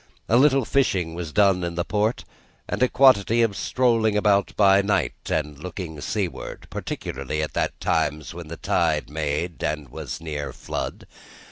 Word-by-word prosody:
A 115 Hz, -, +3 dB
little 135 Hz, 0 st, +5 dB
fishing 95 Hz, -12 st, +1 dB
was 85 Hz, -2 st, -5 dB
done 95 Hz, -1 st, +3 dB
in 85 Hz, -1 st, -3 dB
the 85 Hz, +1 st, -1 dB
port, 110 Hz, +3 st, 0 dB, 0.4 s
and -, -, -3 dB
a 130 Hz, -, +4 dB
quantity 120 Hz, -3 st, +5 dB
of 110 Hz, -4 st, 0 dB
strolling 115 Hz, -4 st, +2 dB
about 100 Hz, -1 st, +3 dB
by 100 Hz, -1 st, +5 dB
night, 100 Hz, +1 st, +1 dB, 0.2 s
and 75 Hz, -2 st, -2 dB
looking 85 Hz, -3 st, -6 dB
seaward: 95 Hz, +3 st, -4 dB
particularly 70 Hz, +4 st, -4 dB
at 75 Hz, -, -4 dB
those -, -, +1 dB
times 75 Hz, +1 st, -1 dB
when 85 Hz, -1 st, -8 dB
the 85 Hz, +1 st, -7 dB
tide -, -, 0 dB
made, 75 Hz, +2 st, -2 dB
and 75 Hz, -3 st, -2 dB
was -, -, -6 dB
near 75 Hz, -3 st, -5 dB
flood. -, -, -5 dB
90 Hz, 160 wpm, -24 LUFS, 75-110 Hz, 0.4 s, little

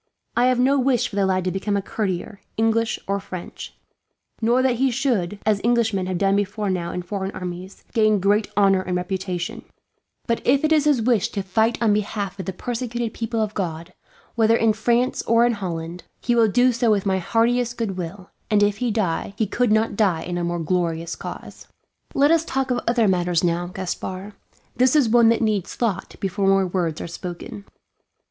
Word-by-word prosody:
I 240 Hz, -, +3 dB
have 255 Hz, -1 st, +2 dB
no 270 Hz, +3 st, +3 dB
wish 255 Hz, -2 st, +2 dB
for -, -, -9 dB
the 200 Hz, -1 st, +2 dB
lad 185 Hz, -1 st, +1 dB
to 185 Hz, -, -1 dB
become 200 Hz, +2 st, -1 dB
a -, -, 0 dB
courtier, 200 Hz, -1 st, -3 dB, 0.2 s
English 225 Hz, 0 st, +1 dB
or 200 Hz, 0 st, 0 dB
French; 185 Hz, -2 st, -8 dB, 0.7 s
nor 240 Hz, +3 st, +3 dB
that 255 Hz, -2 st, +2 dB
he 265 Hz, +2 st, +2 dB
should, 235 Hz, -7 st, 0 dB
as 210 Hz, -2 st, +2 dB
Englishmen 225 Hz, -5 st, +1 dB
have 185 Hz, -1 st, -2 dB
done 195 Hz, +1 st, +2 dB
before 205 Hz, 0 st, -1 dB
now 175 Hz, -2 st, -2 dB
in 180 Hz, -, -4 dB
foreign 190 Hz, +1 st, -3 dB
armies, 180 Hz, +1 st, -7 dB
gain 215 Hz, -2 st, +3 dB
great 205 Hz, +3 st, +2 dB
honour 195 Hz, -2 st, +4 dB
and 180 Hz, -1 st, -2 dB
reputation; 180 Hz, -1 st, -4 dB, 0.6 s
but 230 Hz, -, -1 dB
if 270 Hz, +3 st, +3 dB
it 310 Hz, -, +2 dB
is 305 Hz, -2 st, +4 dB
his 280 Hz, -6 st, +3 dB
wish 230 Hz, -2 st, +2 dB
to 200 Hz, -, -3 dB
fight 220 Hz, +5 st, +1 dB
on 215 Hz, -2 st, +4 dB
behalf 205 Hz, -2 st, -2 dB
of 190 Hz, -, -5 dB
the -, -, -1 dB
persecuted 240 Hz, +2 st, -4 dB
people 230 Hz, 0 st, -3 dB
of 215 Hz, -1 st, -2 dB
God, 170 Hz, -2 st, -4 dB, 0.4 s
whether 225 Hz, -1 st, +3 dB
in 225 Hz, -1 st, +3 dB
France 235 Hz, +3 st, +1 dB
or 230 Hz, +1 st, +5 dB
in 240 Hz, -, +2 dB
Holland, 175 Hz, -4 st, -5 dB, 0.2 s
he 240 Hz, -, 0 dB
will 230 Hz, -2 st, +4 dB
do 250 Hz, +4 st, +4 dB
so 235 Hz, -1 st, +1 dB
with 205 Hz, -2 st, +2 dB
my 190 Hz, -1 st, +1 dB
heartiest 235 Hz, +5 st, +1 dB
goodwill; 190 Hz, -3 st, -5 dB, 0.2 s
and 210 Hz, -1 st, +4 dB
if 205 Hz, 0 st, +1 dB
he 245 Hz, +2 st, -1 dB
die, 200 Hz, -3 st, -1 dB
he 220 Hz, -, +1 dB
could 240 Hz, +3 st, 0 dB
not 220 Hz, 0 st, +2 dB
die 190 Hz, -6 st, +1 dB
in 175 Hz, -, -4 dB
a 175 Hz, -, -2 dB
more 175 Hz, 0 st, -1 dB
glorious 170 Hz, -1 st, -1 dB
cause. -, -, -9 dB, 0.5 s
"Let 285 Hz, +2 st, +4 dB
us 330 Hz, -1 st, +4 dB
talk 265 Hz, -4 st, -2 dB
of 245 Hz, -, +1 dB
other 235 Hz, -2 st, +3 dB
matters 175 Hz, -2 st, +1 dB
now, 175 Hz, 0 st, 0 dB
Gaspard. 185 Hz, +2 st, -5 dB, 0.4 s
This 255 Hz, +3 st, +3 dB
is 285 Hz, -6 st, +4 dB
one 235 Hz, 0 st, +5 dB
that 230 Hz, 0 st, +2 dB
needs 210 Hz, -4 st, -1 dB
thought 210 Hz, -6 st, -2 dB
before 195 Hz, 0 st, -1 dB
more 195 Hz, 0 st, +4 dB
words 175 Hz, -3 st, -2 dB
are -, -, -5 dB
spoken." 175 Hz, +4 st, -7 dB
205 Hz, 200 wpm, -22 LUFS, 185-235 Hz, 0.7 s, or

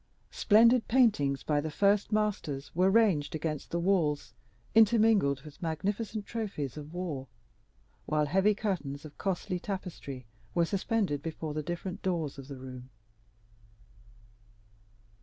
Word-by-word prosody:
Splendid 230 Hz, +3 st, +5 dB
paintings 205 Hz, -, +3 dB
by 150 Hz, -1 st, +1 dB
the 155 Hz, -, -3 dB
first 200 Hz, +6 st, +2 dB
masters 210 Hz, -10 st, -1 dB
were 185 Hz, +3 st, +3 dB
ranged 195 Hz, -9 st, +3 dB
against 155 Hz, -2 st, -3 dB
the 170 Hz, -, -1 dB
walls, 170 Hz, -5 st, +1 dB, 0.4 s
intermingled 215 Hz, -, +4 dB
with 150 Hz, -2 st, -13 dB
magnificent 200 Hz, +6 st, -2 dB
trophies 200 Hz, -, -4 dB
of 150 Hz, 0 st, -8 dB
war, 165 Hz, -7 st, -4 dB, 0.8 s
while 150 Hz, 0 st, +2 dB
heavy 195 Hz, +7 st, +3 dB
curtains 165 Hz, -10 st, -3 dB
of 150 Hz, -, -12 dB
costly 185 Hz, -1 st, -2 dB
tapestry 175 Hz, -, -6 dB, 0.3 s
were 170 Hz, -, +4 dB
suspended 195 Hz, -, 0 dB
before 160 Hz, -1 st, -5 dB
the 155 Hz, -, -2 dB
different 175 Hz, +4 st, -5 dB
doors 165 Hz, -7 st, -2 dB
of 135 Hz, -, -9 dB
the 140 Hz, -2 st, -8 dB
room. 130 Hz, -1 st, -9 dB
170 Hz, 125 wpm, -30 LUFS, 145-205 Hz, 0.8 s, Splendid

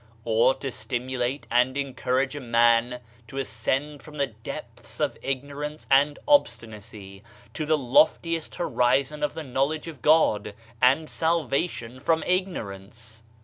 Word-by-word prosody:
Or 115 Hz, +3 st, +3 dB
to 135 Hz, -, -5 dB
stimulate 125 Hz, +4 st, -3 dB
and 125 Hz, +2 st, +2 dB
encourage 130 Hz, 0 st, -1 dB
a -, -, -4 dB
man 120 Hz, 0 st, +2 dB, 0.3 s
to 135 Hz, -, -9 dB
ascend 135 Hz, +4 st, -2 dB
from 150 Hz, -1 st, -12 dB
the 140 Hz, -, +2 dB
depths 110 Hz, -4 st, -9 dB
of -, -, 0 dB
ignorance 145 Hz, +3 st, -4 dB
and 145 Hz, +2 st, +4 dB
obstinacy 110 Hz, -, 0 dB, 0.3 s
to 155 Hz, -, -4 dB
the 155 Hz, 0 st, +3 dB
loftiest 160 Hz, +5 st, +2 dB
horizon 140 Hz, -1 st, +1 dB
of 150 Hz, -1 st, -1 dB
the 160 Hz, -, -5 dB
knowledge 140 Hz, +4 st, -1 dB
of 150 Hz, -7 st, -9 dB
God, 110 Hz, -10 st, +3 dB, 0.3 s
and 135 Hz, +5 st, +4 dB
salvation 140 Hz, -7 st, -1 dB
from 160 Hz, +4 st, +1 dB
ignorance? 115 Hz, -, -4 dB
130 Hz, 130 wpm, -25 LUFS, 115-150 Hz, 0.3 s, and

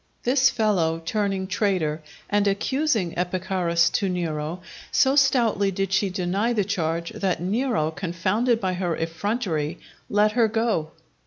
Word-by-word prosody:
This 265 Hz, +2 st, +4 dB
fellow, 185 Hz, -9 st, +1 dB
turning 195 Hz, -1 st, -1 dB
traitor, 185 Hz, -6 st, 0 dB, 0.3 s
and 205 Hz, 0 st, +1 dB
accusing 215 Hz, -, 0 dB
Epicharis 180 Hz, -1 st, +1 dB
to 200 Hz, -3 st, 0 dB
Nero, 165 Hz, -1 st, -3 dB, 0.3 s
so 270 Hz, 0 st, +3 dB
stoutly 235 Hz, -8 st, +3 dB
did 195 Hz, 0 st, -2 dB
she 195 Hz, 0 st, +2 dB
deny 190 Hz, +5 st, 0 dB
the 210 Hz, -4 st, +1 dB
charge, 170 Hz, -3 st, -2 dB
that 190 Hz, -3 st, -1 dB
Nero, 200 Hz, -, 0 dB
confounded 185 Hz, +7 st, 0 dB
by 185 Hz, -4 st, -1 dB
her 180 Hz, -2 st, -1 dB
effrontery, 165 Hz, -2 st, -2 dB, 0.3 s
let 210 Hz, +1 st, +3 dB
her 230 Hz, 0 st, +3 dB
go. 220 Hz, -8 st, 0 dB
195 Hz, 135 wpm, -24 LUFS, 170-220 Hz, 0.3 s, This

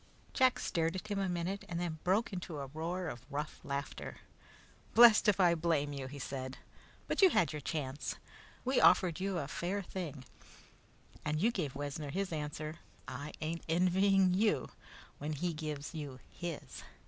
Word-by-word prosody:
Jack 260 Hz, -1 st, +4 dB
stared 165 Hz, 0 st, 0 dB
at 190 Hz, +3 st, -5 dB
him 205 Hz, -1 st, 0 dB
a 195 Hz, -1 st, 0 dB
minute 180 Hz, +3 st, -2 dB
and 170 Hz, 0 st, -2 dB
then 170 Hz, -3 st, -3 dB
broke 195 Hz, +4 st, +2 dB
into 175 Hz, -3 st, -4 dB
a 140 Hz, -, -3 dB
roar 170 Hz, +4 st, -2 dB
of 125 Hz, -5 st, -6 dB
rough 150 Hz, +2 st, -4 dB
laughter. 140 Hz, 0 st, -4 dB, 0.8 s
"Blest 230 Hz, -2 st, +9 dB
if 205 Hz, -2 st, +4 dB
I 175 Hz, -2 st, +6 dB
blame 160 Hz, -3 st, +1 dB
you," 135 Hz, -2 st, -4 dB
he 140 Hz, +2 st, -8 dB
said. 130 Hz, -1 st, -5 dB, 0.5 s
"But -, -, 0 dB
you 380 Hz, -, +9 dB
had 165 Hz, -, +2 dB
your 150 Hz, -, -4 dB
chance! 140 Hz, -1 st, -3 dB, 0.5 s
We 260 Hz, +1 st, +3 dB
offered 180 Hz, -2 st, +5 dB
you 190 Hz, -1 st, -1 dB
a 145 Hz, -5 st, -2 dB
fair 190 Hz, +7 st, -2 dB
thing 155 Hz, -8 st, -6 dB, 1.0 s
and 150 Hz, +1 st, 0 dB
you 225 Hz, +7 st, +3 dB
gave 155 Hz, -, -3 dB
Wessner 145 Hz, +1 st, -4 dB
his 190 Hz, +3 st, -2 dB
answer. 155 Hz, +1 st, -4 dB, 0.3 s
I 140 Hz, +4 st, -6 dB
ain't 165 Hz, +2 st, -2 dB
envying 185 Hz, +2 st, +4 dB
you 210 Hz, +3 st, +2 dB, 0.5 s
when 150 Hz, +2 st, -2 dB
he 170 Hz, +4 st, -1 dB
gives 150 Hz, -1 st, -5 dB
you 145 Hz, -5 st, -5 dB
his." 170 Hz, -3 st, -6 dB
165 Hz, 170 wpm, -34 LUFS, 145-185 Hz, 1.0 s, Blest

